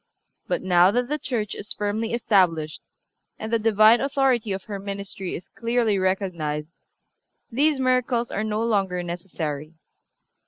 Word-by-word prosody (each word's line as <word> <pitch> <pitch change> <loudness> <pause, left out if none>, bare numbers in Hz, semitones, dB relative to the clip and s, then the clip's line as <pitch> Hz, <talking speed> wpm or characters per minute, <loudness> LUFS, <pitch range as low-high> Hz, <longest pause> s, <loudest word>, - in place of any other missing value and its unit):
But - - -1
now 180 -1 +5
that 245 +4 0
the 300 +1 -1
Church 220 -8 -2
is 205 - -6
firmly 210 +2 -2
established, 180 -9 +1 0.6
and 220 +1 -5
the 230 - +3
Divine 220 +1 +5
authority 270 -5 +1
of 190 0 -3
her 200 -2 -6
ministry 200 -1 -5
is 175 - -9
clearly 230 -3 0
recognized, 170 -6 -1 0.8
these 285 +4 +2
miracles 255 -2 +1
are 215 - -1
no 215 +1 -1
longer 195 -6 0
necessary. 165 -3 -5
210 Hz, 135 wpm, -24 LUFS, 185-235 Hz, 0.8 s, now